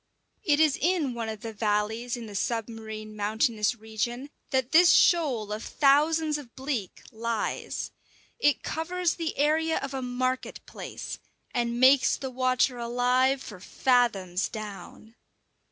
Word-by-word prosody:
It 295 -2 +3
is 310 -3 +3
in 320 -6 +1
one 230 -2 -4
of 220 -1 -6
the 225 -1 -6
valleys 220 +3 -1
in 235 - -7
the 210 - -9
submarine 220 0 -4
mountainous 215 +2 +1
region 235 +5 -4 0.2
that 260 -1 0
this 345 +2 +7
shoal 265 - +3
of 215 - -5
thousands 300 +2 +3
of 250 -5 -13
bleak 260 -8 -4
lies. 230 -1 -3 0.5
It 290 -9 +2
covers 350 +2 -1
the 330 -2 -4
area 315 +2 +2
of 275 - -4
a 265 - -3
market 255 +1 -2
place, - - -7 0.3
and 235 0 -1
makes 265 +1 +5
the 265 -1 -5
water 255 0 +1
alive 250 +3 +1
for 205 -4 -9
fathoms 200 -5 +1
down. 215 +1 -9
245 Hz, 135 wpm, -27 LUFS, 220-280 Hz, 0.5 s, this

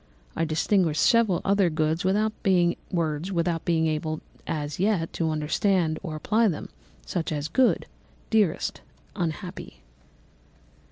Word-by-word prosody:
I 165 - +1
distinguished 160 +1 +2
several 225 -7 +4
other 200 -2 +3
words 155 +1 0
without 210 +3 +1
being 175 -3 +3 0.3
able 160 -1 -1 0.3
as 150 -1 -3
yet 190 -4 +1
to 165 -1 0
understand 160 +2 +1
or 160 -5 -5
apply 220 +9 +2
them, 165 -7 -3 0.4
such 170 -3 -2
as 150 -1 -2
_good, 250 +10 +3 0.5
dearest, 210 -7 +1 0.3
unhappy. 170 - -5
170 Hz, 110 wpm, -26 LUFS, 155-195 Hz, 0.5 s, several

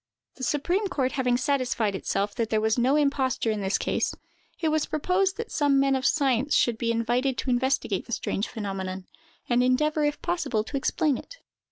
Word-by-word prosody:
The 260 - -8
supreme 345 - 0
court 270 -8 -1
having 250 -2 +1
satisfied 255 -6 0
itself 200 +1 -2
that 230 -2 -2
there 215 - +2
was 220 0 +2
no 255 +3 +2
imposture 275 -5 +1
in 215 -1 -2
this 195 +1 +1
case, - - -1 0.4
it 320 - +1
was 310 -1 +1
proposed 370 +5 0
that 460 0 -5
some 285 -2 +3
men 275 0 +3
of 265 +1 +1
science 275 -1 +2
should 230 -2 +2
be 230 -1 0
invited 245 +3 0
to 260 - -1
investigate 245 -5 0
the - - -10
strange 205 -2 -2
phenomenon, 190 -4 -5 0.4
and 245 0 +3
endeavor 300 +5 +2
if 295 0 0
possible 335 -11 -1
to 255 - -7
explain 275 0 +1
it. - - -12
260 Hz, 190 wpm, -26 LUFS, 230-295 Hz, 0.4 s, some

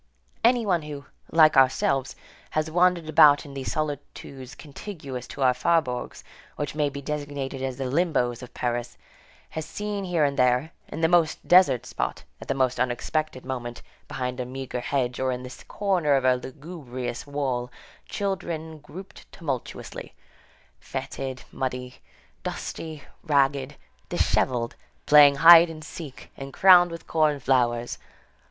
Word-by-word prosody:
Any 240 0 +4
one 180 -4 +1
who, 145 -2 -8 0.3
like 155 -2 +6
ourselves, 135 0 +2 0.3
has 155 0 -2
wandered 175 -1 +2
about 145 -2 +6
in 140 - -10
these 135 -1 -4
solitudes 140 -3 -5
contiguous 140 - -8
to 140 - -4
our 130 -1 +5
faubourgs, 125 -2 -1 0.3
which 145 -1 -4
may 150 -1 0
be 140 0 -8
designated 145 -2 -4
as 130 -1 -3
the 135 - -3
limbos 130 -4 0
of 125 - -10
Paris, 120 0 -3 0.5
has 160 - -4
seen 205 +5 -4
here 175 -4 +1
and 140 -1 0
there, 125 +5 +2 0.2
in - - -6
the 160 - +4
most 170 -2 +2
desert 175 -9 +5
spot, - - -4 0.2
at - - -9
the 135 - -1
most 130 -2 0
unexpected 130 +3 -2
moment, 120 -2 -5 0.2
behind 125 0 -4
a - - -1
meagre 130 -1 -5
hedge, 125 -1 -2
or 130 0 0
in 125 0 -4
the 125 0 -10
corner 180 -8 +1
of 135 -1 +1
a 130 - +5
lugubrious 130 -2 -7
wall, 130 -4 -2 0.4
children 165 -5 -4
grouped 185 +6 -12
tumultuously, 140 -8 -6 0.6
fetid, 130 -1 -6
muddy, 125 -1 -4 0.4
dusty, 155 -4 -6 0.2
ragged, 140 -2 +1 0.3
dishevelled, 120 -2 0 0.3
playing 145 -1 +7
hide 165 +3 +9
and 155 -1 -9
seek, 150 -3 -10
and 135 0 -8
crowned 180 -2 +7
with 165 0 -8
corn 155 -3 +1
flowers. 120 -2 0
140 Hz, 145 wpm, -25 LUFS, 130-160 Hz, 0.6 s, hide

